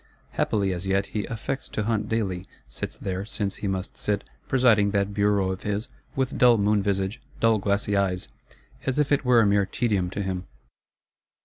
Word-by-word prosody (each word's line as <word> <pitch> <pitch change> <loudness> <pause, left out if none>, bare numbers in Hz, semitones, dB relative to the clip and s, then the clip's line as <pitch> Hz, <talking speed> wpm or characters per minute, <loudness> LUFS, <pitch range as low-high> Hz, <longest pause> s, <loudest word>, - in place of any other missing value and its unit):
Happily 100 -3 +1
as 90 +2 -5
yet 95 +1 +2
he 105 -2 -2
"affects 120 +3 -4
to 110 - -2
hunt 105 -1 -1
daily;" 95 -5 -1 0.2
sits - - -5
there, 95 0 -3
since 100 -1 -2
he 100 - -3
must 95 -1 -3
sit, 105 -1 0 0.2
presiding 115 -6 +4
that 100 0 0
Bureau 100 -2 +2
of 95 - -5
his, 105 +3 -2 0.3
with 130 -1 -1
dull 120 -2 +7
moon 105 0 +3
visage, 100 +2 -1 0.2
dull 115 -1 +4
glassy 100 +1 0
eyes, 95 -2 0 0.6
as 135 - +1
if 150 -1 +2
it 145 - +3
were 125 -2 +5
a - - +4
mere 100 -1 +3
tedium 100 -5 0
to 100 +2 -3
him. 95 -1 -3
100 Hz, 185 wpm, -26 LUFS, 95-110 Hz, 0.6 s, dull